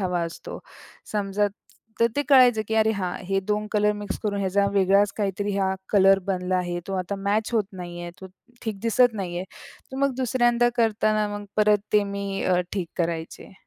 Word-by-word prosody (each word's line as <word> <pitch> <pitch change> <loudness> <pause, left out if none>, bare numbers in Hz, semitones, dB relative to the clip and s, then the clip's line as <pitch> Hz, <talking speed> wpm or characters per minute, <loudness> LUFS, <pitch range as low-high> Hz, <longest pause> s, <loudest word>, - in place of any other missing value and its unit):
हवा 180 -2 0
असतो. - - -9 0.5
समजा 205 0 0 0.5
तर 230 - +6
ते 285 - +2
कळायचं 250 -5 +6
की 220 - -1
अरे, 220 0 +4
हां, 185 -4 -3
हे 195 +1 0
2 210 0 0
कलर 210 -1 +3
मिक्स 200 -1 -4
करून 205 -2 -1
ह्याचा 200 +1 +2
वेगळाच 200 +1 +3
काहीतरी 205 0 -1
हा 190 -1 +1 0.2
कलर 195 -1 +5
बनला 185 -1 0
आहे. 175 -1 -2
तो 195 - -3
आता 185 +2 -3
मॅच 215 +3 0
होत 220 -3 +2 0.2
नाही 175 0 -7
आहे. 175 - -6
तो 190 - -8 0.4
ठीक 220 -4 -4
दिसत 230 +2 +3
नाही 185 -4 -4
आहे. 180 - -3 0.5
तर 265 - -5
मग 275 -1 +1
दुसऱ्यांदा 240 -1 +2
करताना 215 -2 +2
मग 205 - -9
परत 210 -1 +4
ते 210 - +6
अ, - - -2
मी 200 -1 -4 0.3
ठीक 185 -4 -2
करायचे. 165 0 -3
200 Hz, 190 wpm, -24 LUFS, 190-220 Hz, 0.5 s, तर